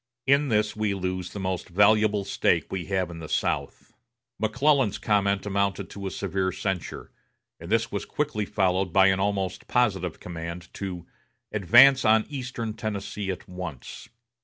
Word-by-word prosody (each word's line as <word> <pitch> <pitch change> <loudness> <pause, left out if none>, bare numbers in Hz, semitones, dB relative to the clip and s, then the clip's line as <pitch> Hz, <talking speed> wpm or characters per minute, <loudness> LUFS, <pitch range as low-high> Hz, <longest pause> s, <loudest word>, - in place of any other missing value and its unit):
In 140 +1 +3
this 105 -1 +1
we 105 -2 -1
lose 95 -1 -3
the 100 - -7
most 95 -1 -3
valuable 105 +2 +3
stake 100 - +1
we 95 -3 -3
have 95 -2 -1
in 85 - -8
the 80 -2 -8
South." - - -2 0.5
McClellan's 125 +1 +2
comment 100 -2 +1
amounted 100 -1 -1
to 100 -1 -6
a - - -2
severe 95 -1 -2
censure, 95 -1 -4 0.5
and 85 +4 -9
this 115 0 +1
was 100 - -3
quickly 145 -8 -2
followed 95 -1 +1
by 95 +1 +5
an 95 0 +1
almost 95 -2 -2
positive 95 -9 0
command 85 0 -7
to 90 -4 -6 0.5
"advance 120 +7 +6
on 110 0 +4
eastern 125 -5 -4
Tennessee 105 -2 -4
at 95 -1 -5
once." 90 - -8
100 Hz, 155 wpm, -26 LUFS, 95-110 Hz, 0.5 s, advance